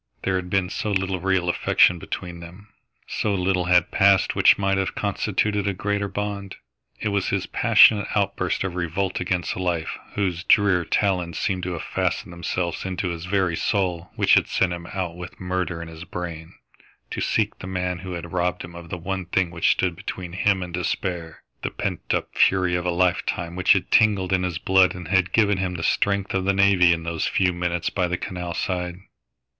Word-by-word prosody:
There 95 - 0
had 90 -1 -5
been 95 0 0
so 105 - -3
little 95 -1 0
real 95 -1 0
affection 90 0 +3
between 85 +1 -6
them. 90 +5 -12 0.4
So 105 -2 -1
little 90 -1 0
had 90 -1 +3
passed 100 -1 +4
which - - +6
might 95 -1 +1
have 95 - -2
constituted 105 0 -1
a 100 - -1
greater 100 +1 -1
bond. 100 0 -4 0.4
It 110 - -1
was 100 -2 0
his - - -1
passionate 105 -2 +5
outburst 100 -3 0
of 95 -2 -3
revolt 90 +2 -2
against 90 -2 -1
life, 85 -3 -2 0.2
whose 90 -3 -1
drear 100 -4 +3
talons 90 -4 0
seemed 95 -2 -1
to 90 0 -3
have 85 - -5
fastened 85 - -2
themselves 85 0 -3
into 95 0 -2
his 85 0 -5
very 95 -3 +1
soul, 90 -3 -1
which - - +3
had - - +5
sent 90 -2 +1
him 85 -1 -7
out 90 -3 -4
with 90 0 -9
murder 90 -2 -2
in - - -9
his 80 -1 -9
brain 85 -2 -7 0.6
to - - -3
seek - - 0
the 90 - -7
man 90 -1 -2
who 90 0 -6
had 85 0 -7
robbed 90 0 -1
him 85 - -10
of 85 -1 -10
the 90 - -4
one 95 +1 -4
thing 90 -1 0
which 85 -1 +1
stood 90 -2 +1
between 90 +1 -6
him 95 0 +1
and 90 -1 -8
despair; 85 -3 -3 0.2
the - - -2
pent - - -4
up - - -2
fury 90 -2 +3
of 90 0 -1
a - - +2
lifetime 85 -1 0
which 90 -1 +5
had - - -2
tingled 100 -4 +3
in 90 - +2
his 90 -2 -2
blood 95 0 +3
and 90 -3 -8
had 95 -1 +2
given 105 -3 +3
him 90 -1 -2
the 80 - -4
strength 100 +2 +1
of 95 -1 0
the 100 - +3
navvy 95 -3 +5
in 85 -1 0
those 85 -1 -2
few 90 -2 +1
minutes 85 -1 -2
by 90 -2 0
the 90 0 -2
canal 90 -2 -5
side. 90 -2 -2
90 Hz, 200 wpm, -23 LUFS, 85-95 Hz, 0.6 s, which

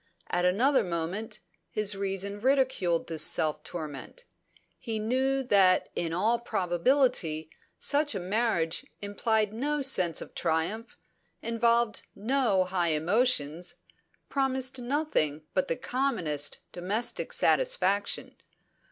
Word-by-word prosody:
At 175 0 +1
another 245 +10 +3
moment, 185 +5 -4 0.3
his 210 -1 +1
reason 200 +1 -3
ridiculed 255 -10 +1
this 160 -2 +3
self 150 -1 +1
torment. 160 - -7 0.5
He 225 -2 -3
knew 260 +5 0
that 195 -6 +4
in 165 -1 -2
all 220 +8 +1
probability 180 - +1 0.3
such 295 -3 +1
a - - -1
marriage 185 -4 0 0.2
implied 215 +1 0
no 290 +5 -1
sense 180 - +3
of - - -9
triumph, 170 +8 -2 0.5
involved 230 0 +1
no 220 -3 +2
high 180 -3 0
emotions, 175 - +1 0.5
promised 265 -1 -1
nothing 240 - -1
but 185 - +1
the 165 - 0
commonest 170 - -1
domestic 200 +7 -2
satisfaction. - - +1
205 Hz, 110 wpm, -28 LUFS, 175-250 Hz, 0.5 s, that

